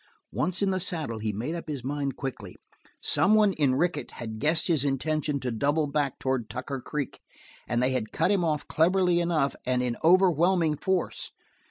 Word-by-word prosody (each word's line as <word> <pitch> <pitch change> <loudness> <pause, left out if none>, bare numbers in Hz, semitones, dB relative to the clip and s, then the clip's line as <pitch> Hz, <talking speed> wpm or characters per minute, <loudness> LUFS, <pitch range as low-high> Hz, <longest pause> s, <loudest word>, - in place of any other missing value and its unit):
Once 185 +2 0
in 195 - +2
the 185 - 0
saddle 155 -11 -2
he 110 0 -2
made 115 +10 -4
up 170 -1 -6
his 145 -5 -5
mind 140 0 -2
quickly. 115 -9 -6 0.5
Someone 210 -1 +4
in 140 -6 +2
Rickett 160 0 -1
had 110 -2 -6
guessed 160 +5 +2
his 160 -6 +2
intention 145 +1 -1
to 125 - -2
double 145 +7 +1
back 145 -2 -1
toward 130 -4 -2
Tucker 130 +3 -5
Creek, 140 0 -4 0.5
and 120 +1 0
they 130 - +2
had 125 -4 -2
cut - - +1
him 195 -3 +2
off 155 -3 -1
cleverly 180 +1 +3
enough 160 -6 +1
and 125 0 0
in 120 -1 -1
overwhelming 175 -2 +4
force. 190 +4 -2
150 Hz, 180 wpm, -27 LUFS, 130-170 Hz, 0.5 s, Someone